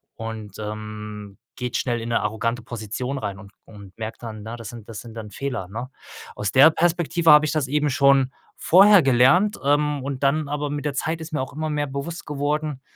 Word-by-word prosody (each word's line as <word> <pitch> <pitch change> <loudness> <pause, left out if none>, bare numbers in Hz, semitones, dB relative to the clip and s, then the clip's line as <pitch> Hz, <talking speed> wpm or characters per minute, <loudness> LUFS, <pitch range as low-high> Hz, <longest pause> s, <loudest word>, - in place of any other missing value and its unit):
Und, 110 -3 -7
ähm, 105 -1 -7 0.2
geht 125 -2 -4
schnell 120 -3 -1
in 115 - -5
'ne 115 - +1
arrogante 115 +3 -2
Position 120 +4 -4
rein 100 -5 -4
und 100 -1 -13
und 100 -3 -14
merkt 110 +1 -7
dann, 110 -2 -7
ja, 115 +1 -6
das 115 -3 -8
sind 115 -3 -11
das 110 - -7
sind 115 -1 -12
dann 105 -2 -8
Fehler, 125 -9 -4
ne? 120 +5 -6 0.5
Aus 105 0 -2
der 140 +5 +7
Perspektive 170 0 +1
habe 150 +1 +7
ich - - -1
das 150 -4 0
eben 150 +1 +1
schon 135 0 +4 0.3
vorher 195 +2 +7
gelernt, 135 +11 +4
ähm, 145 0 +1
und 140 -1 -4
dann 145 +2 +2
aber 145 0 -2
mit 145 0 -4
der 145 - -1
Zeit 160 +3 -2
ist 160 0 -8
mir 140 - 0
auch 130 - -6
immer 155 +1 -3
mehr 145 -1 -1
bewusst 140 +5 -6
geworden, 150 -1 -2
130 Hz, 210 wpm, -23 LUFS, 110-150 Hz, 0.5 s, der